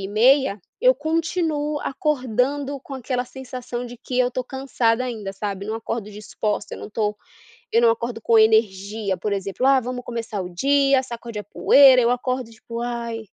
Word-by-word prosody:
e 195 - -4
meia, 235 0 +3 0.2
eu 255 +1 +5
continuo 315 0 -1
acordando 275 0 -1
com 275 - -9
aquela 250 0 -2
sensação 250 -1 -7
de 245 0 -9
que 250 +1 -4
eu 250 -1 +4
estou 255 0 -4
cansada 255 -3 0
ainda, 220 -6 -5
sabe, 200 0 -5
não 220 - -3
acordo 225 -1 -4
disposta, 210 0 -4
eu - - -9
não - - -7
estou 210 -1 -2 0.6
eu 235 - +4
não 235 - +6
acordo 230 0 -2
com 230 +1 +4
energia, 215 -2 +2
por 210 - -3
exemplo, 200 +5 -2
"ah, 270 0 +6
vamos 250 0 -5
começar 230 -4 -4
o 180 - -6
dia, 275 +4 +3
sacode 235 -3 -7
a - - -6
poeira", 260 +5 +6
eu 235 - +3
acordo 250 -1 -2
tipo, 230 +1 -7
"Ai". 235 -1 -4
240 Hz, 180 wpm, -22 LUFS, 220-265 Hz, 0.6 s, não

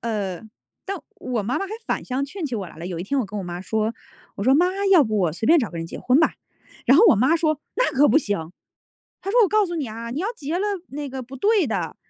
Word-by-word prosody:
呃， 205 -6 -3 0.5
但 395 +1 -2 0.2
我 245 -4 -3
妈 235 +6 -1
妈 390 - -3
还 400 - -8
反 - - -1
向 260 +2 -1
劝 320 +4 -5
起 255 - -4
我 195 -3 -4
来 - - -14
了。 165 +2 -7
有 180 -2 -4
一 - - -3
天 270 +9 0
我 235 - -2
跟 205 +2 -6
我 195 - -4
妈 175 0 -5
说， 220 +3 -1 0.4
我 - - -4
说： 260 +3 +5
“妈， 350 +4 +4 0.2
要 350 -7 +7
不 215 -1 -1
我 175 -5 +1
随 180 - -4
便 335 +5 +6
找 235 -8 -1
个 170 - -8
人 165 0 -4
结 - - -8
婚 255 +2 +3
吧。” 320 - +3 0.5
然 260 - +7
后 400 - +7
我 - - +7
妈 260 +10 +3
说： 310 -3 0 0.2
“那 - - +3
可 285 +2 +5
不 - - +4
行。 200 - -1 0.7
她 390 - -5
说 475 +5 +3
我 - - +4
告 425 +1 +3
诉 345 - -4
你 295 -6 -2
啊， 230 +2 -6
你 255 +6 -4
要 380 - -1
结 315 -2 -3
了 395 - 0 0.2
那 290 +1 -5
个 265 -1 -6
不 255 +2 -10
对 405 - +2
的， 225 - -2
260 Hz, 300 characters per minute, -23 LUFS, 210-325 Hz, 0.7 s, 要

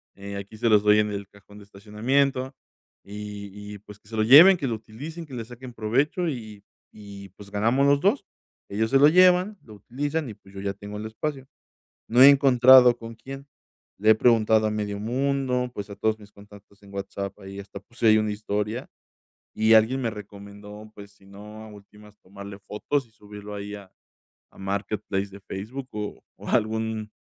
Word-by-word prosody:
eh, 100 0 -8
aquí 100 +2 -9
se 115 +1 +1
los 105 -2 +5
doy 105 0 +5
en 105 0 0
el 100 -1 -6
cajón 100 0 -18
de 100 - -14
estacionamiento, 130 +7 -1 0.5
y 105 0 -8 0.2
y, 100 - -11
pues, 105 0 -15
que - - -26
se 115 - -7
lo 110 - +2
lleven, 160 - +9
que 145 - -4
lo 115 - -1
utilicen, 145 +10 -9
que 145 - -14
le 115 - -4
saquen 125 +1 -11
provecho, 135 +11 0
y 110 -6 -8 0.3
y 100 -2 -11
pues 100 -1 -14
ganamos 115 +7 +1
los 140 0 +4
2. - - +2 0.5
Ellos 110 +3 -1
se 135 - +5
lo 145 - +7
llevan, 185 +4 +4
lo 110 - -14
utilizan 145 +7 -4
y, - - -7
pues, 100 -2 -20
yo 95 - -7
ya 100 0 -3
tengo 100 +1 -10
el 105 - -6
espacio. 135 +4 -5 0.6
No 120 +2 +3
he 135 - +11
encontrado 130 -2 +6
con 115 0 -9
quién, 135 +4 -10 0.5
le 110 +2 +3
he - - +8
preguntado 110 -2 +3
a - - 0
medio 105 -1 -3
mundo, 125 +1 -1
pues, 100 0 -6
a 100 - -8
todos 110 0 0
mis 105 -1 -16
contactos 100 0 -18
en 100 0 -16
WhatsApp. 100 0 -6
Ahí 95 0 -10
hasta 100 0 -10
puse 115 +3 -1
ahí 110 0 +6
una 110 -1 -1
historia 105 +3 -4 0.7
y 110 +1 +3
alguien 110 +5 +4
me 115 -3 -1
recomendó, 105 +1 -11
pues, 100 0 -13
si 100 - -24
no, 105 +2 -12
a 110 - -11
últimas, 105 0 -17
tomarle 100 +1 -11
fotos 110 +7 -3
y 110 - -30
subirlo 105 -1 -11
ahí 100 +1 -7
a 100 -2 -13 0.6
a - - -22
Marketplace 100 0 -3
de 100 +1 -12
Facebook 115 +8 -7
o 105 -1 -6
o - - -9
algún 110 0 -1
110 Hz, 195 wpm, -25 LUFS, 100-125 Hz, 0.7 s, he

